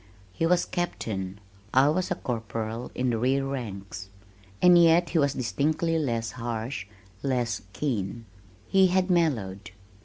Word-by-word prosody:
He 165 Hz, -, 0 dB
was 175 Hz, +1 st, +3 dB
Captain, 100 Hz, -, -3 dB, 0.4 s
I 135 Hz, +2 st, +6 dB
was 185 Hz, +4 st, 0 dB
a -, -, 0 dB
corporal 115 Hz, 0 st, -4 dB
in 125 Hz, 0 st, 0 dB
the 115 Hz, -, -1 dB
rear 135 Hz, +3 st, +1 dB
ranks. 100 Hz, -8 st, -6 dB, 0.5 s
And 180 Hz, 0 st, +7 dB
yet 170 Hz, +1 st, +5 dB
he 170 Hz, -, +2 dB
was 140 Hz, -2 st, +2 dB
distinctly 155 Hz, +6 st, 0 dB
less 115 Hz, -6 st, -1 dB
harsh, 115 Hz, -3 st, -4 dB, 0.3 s
less 125 Hz, -5 st, -1 dB
keen. 115 Hz, -2 st, -3 dB, 0.4 s
He 190 Hz, -1 st, +5 dB
had 185 Hz, +1 st, +1 dB
mellowed. 110 Hz, -, 0 dB
125 Hz, 135 wpm, -27 LUFS, 110-165 Hz, 0.5 s, And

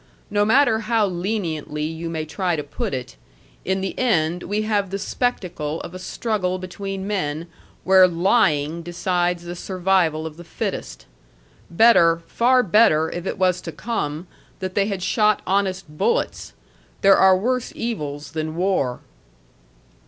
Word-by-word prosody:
No 205 Hz, 0 st, +2 dB
matter 225 Hz, 0 st, +4 dB
how 225 Hz, -1 st, +1 dB
leniently 175 Hz, -6 st, -3 dB
you 165 Hz, +2 st, -4 dB
may 160 Hz, -1 st, -3 dB
try 175 Hz, +2 st, -1 dB
to 150 Hz, -, -3 dB
put 145 Hz, -, -4 dB
it, 125 Hz, -, -5 dB, 0.5 s
in 190 Hz, +1 st, -1 dB
the 190 Hz, -, -3 dB
end 175 Hz, -8 st, +1 dB
we 210 Hz, +4 st, -2 dB
have 205 Hz, -3 st, 0 dB
the 195 Hz, -, -3 dB
spectacle 175 Hz, -, -2 dB
of 175 Hz, -, -8 dB
a 185 Hz, -, -7 dB
struggle 185 Hz, -2 st, -2 dB
between 190 Hz, +1 st, -6 dB
men 165 Hz, -6 st, -2 dB, 0.4 s
where 190 Hz, 0 st, +7 dB
lying 170 Hz, -4 st, +1 dB
decides 175 Hz, 0 st, -1 dB
the 175 Hz, 0 st, -6 dB
survival 180 Hz, -4 st, 0 dB
of 160 Hz, -1 st, -7 dB
the 175 Hz, -, -10 dB
fittest. 170 Hz, -, -5 dB, 0.6 s
Better, 170 Hz, -4 st, +5 dB
far 250 Hz, +6 st, +3 dB
better, 165 Hz, -6 st, +4 dB
if 175 Hz, +2 st, -5 dB
it -, -, -3 dB
was 185 Hz, -1 st, +2 dB
to 165 Hz, -, -6 dB
come, 160 Hz, -3 st, -3 dB, 0.3 s
that 185 Hz, -1 st, -5 dB
they 200 Hz, 0 st, +1 dB
had 195 Hz, -3 st, -3 dB
shot 210 Hz, +2 st, +2 dB
honest 190 Hz, -1 st, 0 dB
bullets. 310 Hz, -, -1 dB, 0.5 s
There 195 Hz, 0 st, +7 dB
are 190 Hz, -1 st, +5 dB
worse 250 Hz, +5 st, -1 dB
evils 150 Hz, -11 st, -4 dB
than 155 Hz, 0 st, -4 dB
war." 175 Hz, -9 st, 0 dB
185 Hz, 150 wpm, -22 LUFS, 165-205 Hz, 0.6 s, where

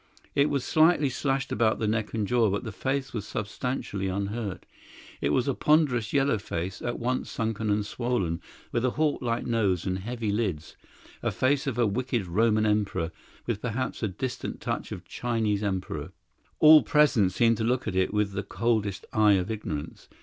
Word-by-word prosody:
It 140 Hz, +1 st, +3 dB
was 140 Hz, -3 st, -1 dB
slightly 155 Hz, -2 st, +4 dB
slashed 135 Hz, +1 st, -1 dB
about 110 Hz, 0 st, +2 dB
the 110 Hz, -, -2 dB
neck 110 Hz, 0 st, -1 dB
and 110 Hz, -2 st, 0 dB
jaw, 115 Hz, 0 st, +3 dB
but 100 Hz, +2 st, -1 dB
the 110 Hz, -, -5 dB
face 135 Hz, +6 st, -2 dB
was 105 Hz, -3 st, -4 dB
substantially 105 Hz, -2 st, -3 dB
unhurt. 100 Hz, 0 st, -3 dB, 0.6 s
It -, -, +1 dB
was 120 Hz, -, +1 dB
a 140 Hz, -, +2 dB
ponderous, 130 Hz, -8 st, +2 dB
yellow 135 Hz, -5 st, +2 dB
face, 90 Hz, -1 st, -4 dB
at 120 Hz, -, -2 dB
once 125 Hz, +2 st, -2 dB
sunken 110 Hz, -1 st, -2 dB
and 105 Hz, 0 st, +1 dB
swollen, 105 Hz, -8 st, -1 dB, 0.3 s
with 120 Hz, -, 0 dB
a 130 Hz, -, +3 dB
hawk 155 Hz, -2 st, +1 dB
like 120 Hz, -2 st, -1 dB
nose 105 Hz, -7 st, +1 dB
and 95 Hz, -1 st, -1 dB
heavy 115 Hz, +1 st, -3 dB
lids 95 Hz, -8 st, -2 dB, 0.5 s
a -, -, 0 dB
face 135 Hz, +2 st, +1 dB
of 125 Hz, -4 st, -2 dB
a 120 Hz, -, +3 dB
wicked 120 Hz, 0 st, -1 dB
Roman 110 Hz, +4 st, +2 dB
emperor, 105 Hz, -5 st, 0 dB, 0.3 s
with, 110 Hz, -3 st, -2 dB
perhaps, 125 Hz, +1 st, -3 dB
a 110 Hz, -, +1 dB
distant 125 Hz, +6 st, -4 dB
touch -, -, -3 dB
of 90 Hz, -, -5 dB
a 90 Hz, -, -32 dB
Chinese 110 Hz, -4 st, -1 dB
emperor. 95 Hz, -3 st, -3 dB, 0.4 s
All 155 Hz, 0 st, +9 dB
present 145 Hz, -11 st, +3 dB
seemed 115 Hz, +4 st, +3 dB
to 110 Hz, -, -2 dB
look 125 Hz, +2 st, 0 dB
at 100 Hz, -, -2 dB
it 95 Hz, 0 st, +2 dB
with 105 Hz, -1 st, +1 dB
the 100 Hz, -, -2 dB
coldest 105 Hz, -1 st, -1 dB
eye 105 Hz, -1 st, +5 dB
of 95 Hz, +2 st, 0 dB
ignorance. 85 Hz, -9 st, -5 dB
110 Hz, 185 wpm, -27 LUFS, 100-125 Hz, 0.6 s, All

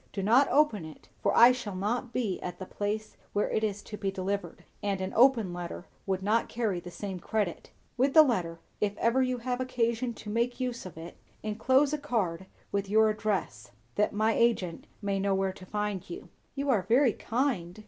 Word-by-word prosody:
Do 195 Hz, -, -3 dB
not 245 Hz, +7 st, +5 dB
open 280 Hz, -, +3 dB
it; 155 Hz, -1 st, -12 dB
for -, -, +1 dB
I 240 Hz, +2 st, +9 dB
shall 235 Hz, -6 st, -4 dB
not 230 Hz, +6 st, -2 dB
be 225 Hz, -7 st, -2 dB
at 180 Hz, -, -5 dB
the 185 Hz, -, -6 dB
place 210 Hz, +3 st, -4 dB, 0.2 s
where 205 Hz, -, 0 dB
it 220 Hz, -, 0 dB
is 205 Hz, -2 st, -2 dB
to 210 Hz, -, -8 dB
be 200 Hz, -2 st, -1 dB
delivered, 195 Hz, +1 st, -3 dB, 0.2 s
and 200 Hz, -2 st, -1 dB
an 190 Hz, 0 st, -3 dB
open 230 Hz, -6 st, +5 dB
letter 175 Hz, 0 st, -6 dB, 0.2 s
would 190 Hz, -1 st, -1 dB
not 220 Hz, +3 st, +1 dB
carry 220 Hz, -6 st, -1 dB
the 175 Hz, -, -9 dB
same 190 Hz, 0 st, -6 dB
credit. 205 Hz, -2 st, -2 dB, 0.3 s
With 270 Hz, +2 st, +2 dB
the 315 Hz, -, +11 dB
letter, 180 Hz, -, -1 dB, 0.2 s
if 205 Hz, -1 st, -1 dB
ever 235 Hz, +3 st, +2 dB
you 255 Hz, -1 st, +1 dB
have 250 Hz, +1 st, -2 dB
occasion 235 Hz, -1 st, -1 dB
to 210 Hz, -, -7 dB
make 235 Hz, +3 st, 0 dB
use 245 Hz, -5 st, -3 dB
of 180 Hz, -, -12 dB
it, 165 Hz, +1 st, -9 dB, 0.3 s
enclose 260 Hz, +7 st, +2 dB
a 300 Hz, -, -1 dB
card 195 Hz, -, -2 dB, 0.2 s
with 200 Hz, -1 st, -1 dB
your 220 Hz, +1 st, +5 dB
address; 195 Hz, -, -3 dB, 0.2 s
that 210 Hz, -, +1 dB
my 215 Hz, +2 st, +2 dB
agent 215 Hz, -8 st, +1 dB, 0.2 s
may 200 Hz, -1 st, 0 dB
know 195 Hz, 0 st, +1 dB
where 190 Hz, 0 st, 0 dB
to 185 Hz, 0 st, -13 dB
find 210 Hz, -2 st, -3 dB
you." 350 Hz, -, -8 dB, 0.3 s
"You 280 Hz, 0 st, 0 dB
are 215 Hz, -6 st, +3 dB
very 235 Hz, +5 st, +3 dB
kind!" 225 Hz, -8 st, -2 dB
210 Hz, 200 wpm, -29 LUFS, 190-245 Hz, 0.3 s, the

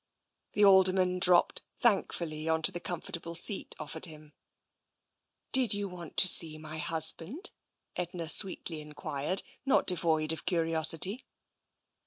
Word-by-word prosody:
The 210 Hz, -, +3 dB
Alderman 185 Hz, -1 st, +4 dB
dropped 180 Hz, -1 st, +2 dB, 0.2 s
thankfully 165 Hz, -8 st, -1 dB
on 160 Hz, 0 st, -1 dB
to -, -, +6 dB
the 175 Hz, -, -6 dB
com 175 Hz, -1 st, -6 dB
fortable 170 Hz, 0 st, -3 dB
seat 195 Hz, +3 st, +1 dB
offered 155 Hz, +2 st, -5 dB
him. 155 Hz, -2 st, -13 dB, 1.2 s
Did 255 Hz, -5 st, +5 dB
you 205 Hz, 0 st, -4 dB
want 180 Hz, -3 st, -11 dB
to 180 Hz, +1 st, +5 dB
see 160 Hz, -3 st, +3 dB
my 155 Hz, 0 st, -9 dB
husband? 165 Hz, -, -5 dB, 0.2 s
" -, -, -51 dB
Edna 175 Hz, -1 st, -5 dB
sweetly 170 Hz, -2 st, +2 dB
enquired, 150 Hz, +3 st, -4 dB, 0.2 s
not 270 Hz, -, +1 dB
devoid 160 Hz, -4 st, +1 dB
of 160 Hz, -, -6 dB
curiosity. 165 Hz, -, +2 dB
170 Hz, 135 wpm, -29 LUFS, 160-185 Hz, 1.2 s, to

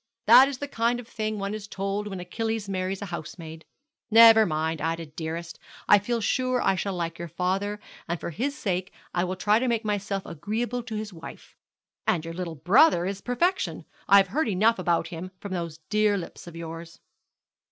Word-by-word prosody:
That 265 Hz, -, +9 dB
is 275 Hz, -2 st, -4 dB
the 285 Hz, -, -5 dB
kind 235 Hz, -2 st, 0 dB
of 240 Hz, -, -10 dB
thing 215 Hz, -2 st, -3 dB
one 200 Hz, 0 st, -3 dB
is 215 Hz, -1 st, -6 dB
told 200 Hz, +1 st, -3 dB
when 195 Hz, -2 st, -5 dB
Achilles 220 Hz, +4 st, -3 dB
marries 190 Hz, 0 st, -3 dB
a 190 Hz, -3 st, -7 dB
housemaid. 160 Hz, -1 st, -8 dB, 0.4 s
Never 225 Hz, -1 st, +8 dB
mind, 160 Hz, 0 st, -1 dB
Ida, 165 Hz, +1 st, -2 dB
dearest, 160 Hz, +2 st, -6 dB, 0.3 s
I 205 Hz, -, +7 dB
feel 235 Hz, +4 st, -2 dB
sure 255 Hz, +4 st, +1 dB
I -, -, +2 dB
shall 190 Hz, +1 st, -2 dB
like 170 Hz, -1 st, -4 dB
your 170 Hz, -, -5 dB
father; 195 Hz, +5 st, -2 dB, 0.3 s
and 170 Hz, -1 st, -2 dB
for -, -, -5 dB
his 275 Hz, -, -2 dB
sake 185 Hz, -2 st, -2 dB, 0.2 s
I 175 Hz, -, +1 dB
will 185 Hz, +1 st, -2 dB
try 205 Hz, +4 st, +3 dB
to 255 Hz, -, 0 dB
make 230 Hz, -2 st, 0 dB
myself 200 Hz, -2 st, -2 dB
agreeable 225 Hz, +9 st, -3 dB
to 230 Hz, -2 st, -7 dB
his 215 Hz, -1 st, -5 dB
wife. 165 Hz, -1 st, -11 dB, 0.5 s
And 165 Hz, -2 st, +1 dB
your 165 Hz, -, -5 dB
little 170 Hz, -2 st, -5 dB
brother 180 Hz, -, +4 dB
is 195 Hz, +1 st, -4 dB
perfection. 345 Hz, +10 st, -1 dB, 0.2 s
I 200 Hz, -, +8 dB
have 195 Hz, -1 st, +4 dB
heard 305 Hz, +9 st, 0 dB
enough 215 Hz, +3 st, +3 dB
about 170 Hz, -2 st, 0 dB
him 175 Hz, +1 st, -6 dB
from 200 Hz, -2 st, -6 dB
those 170 Hz, -3 st, -4 dB
dear 210 Hz, -1 st, +3 dB
lips 175 Hz, -1 st, -8 dB
of 170 Hz, -, -10 dB
yours.' 165 Hz, 0 st, -8 dB
195 Hz, 195 wpm, -26 LUFS, 170-220 Hz, 0.5 s, That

